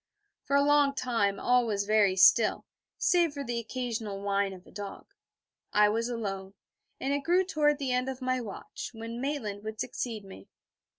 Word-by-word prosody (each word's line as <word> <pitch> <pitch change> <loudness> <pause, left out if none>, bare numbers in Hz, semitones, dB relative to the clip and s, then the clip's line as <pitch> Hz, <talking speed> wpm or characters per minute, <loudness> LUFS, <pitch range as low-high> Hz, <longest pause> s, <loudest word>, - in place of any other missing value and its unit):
For 280 - -1
a 280 - +5
long 290 -1 +4
time 225 -7 0
all 245 -1 +3
was 200 -2 0
very 210 -3 +3
still, 185 - +5 0.3
save 340 -4 +2
for 280 - -4
the 240 -3 -2
occasional 230 -4 -4
whine 200 0 0
of 185 -1 -11
a - - -17
dog. 205 -1 -7 0.7
I 210 0 +5
was 230 +3 -1
alone, 195 -4 -4 0.4
and 275 +1 -1
it 285 - +1
grew 355 +6 +2
toward 300 -4 +2
the 275 -3 -2
end 250 +1 0
of 260 -1 -5
my 255 -1 -1
watch, 210 -5 -7
when 230 +1 -6
Maitland 225 -8 -3
would 220 0 -6
succeed 220 -5 -4
me. 145 - -12
235 Hz, 180 wpm, -29 LUFS, 205-275 Hz, 0.7 s, a